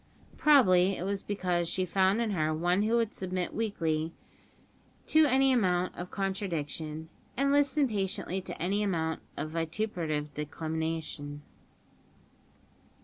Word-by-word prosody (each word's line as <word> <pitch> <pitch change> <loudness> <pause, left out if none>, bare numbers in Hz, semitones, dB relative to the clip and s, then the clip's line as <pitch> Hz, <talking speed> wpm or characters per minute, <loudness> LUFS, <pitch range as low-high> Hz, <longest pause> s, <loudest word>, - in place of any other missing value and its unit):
Probably 195 -11 +5
it - - -4
was 195 0 -2
because 180 -4 -1
she 185 - 0
found 190 +4 +2
in 225 -2 0
her 155 -5 +1
one 175 +4 +2
who 220 +2 +2
would 230 -2 +1
submit 185 -1 -3
meekly 165 -8 -1 0.9
to 315 -1 +5
any 265 0 +4
amount 185 -6 +1
of 175 +1 -6
contradiction, 160 -5 -3 0.3
and 275 +1 +2
listen 285 0 +3
patiently 195 -3 -2
to - - -8
any 195 +5 0
amount 165 -5 -1 0.2
of 155 +2 -4
vituperative 165 -3 -2
declamation. 155 -1 -4
185 Hz, 125 wpm, -30 LUFS, 160-210 Hz, 0.9 s, Probably